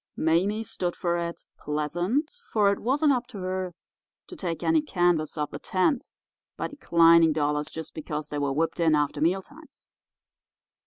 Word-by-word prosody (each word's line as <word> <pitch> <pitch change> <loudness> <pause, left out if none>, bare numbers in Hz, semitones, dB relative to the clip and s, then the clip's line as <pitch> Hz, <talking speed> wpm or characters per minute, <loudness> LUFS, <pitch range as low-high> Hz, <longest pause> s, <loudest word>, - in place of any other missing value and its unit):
Mame 190 +7 +1
stood 180 -5 -3
for 175 -1 -1
it, 170 0 -4
pleasant, 175 - -1 0.2
for 205 -2 +4
it 200 - -2
wasn't 285 +5 +2
up 245 -1 -2
to 245 - -10
her 185 -1 -3 0.5
to 365 - -10
take 175 - -4
any 320 -1 +3
canvas 175 - +1
off 150 -1 -2
the - - -6
tent 215 +8 0 0.5
by - - -2
declining 170 - +5
dollars 150 0 0
just 160 0 -7
because 150 -1 -5
they 145 - -3
were 140 -1 0
whipped 160 +4 -1
in 160 -2 +4
after 145 0 0
meal 185 +4 +2
times. 305 +6 -15
175 Hz, 165 wpm, -26 LUFS, 155-210 Hz, 0.5 s, declining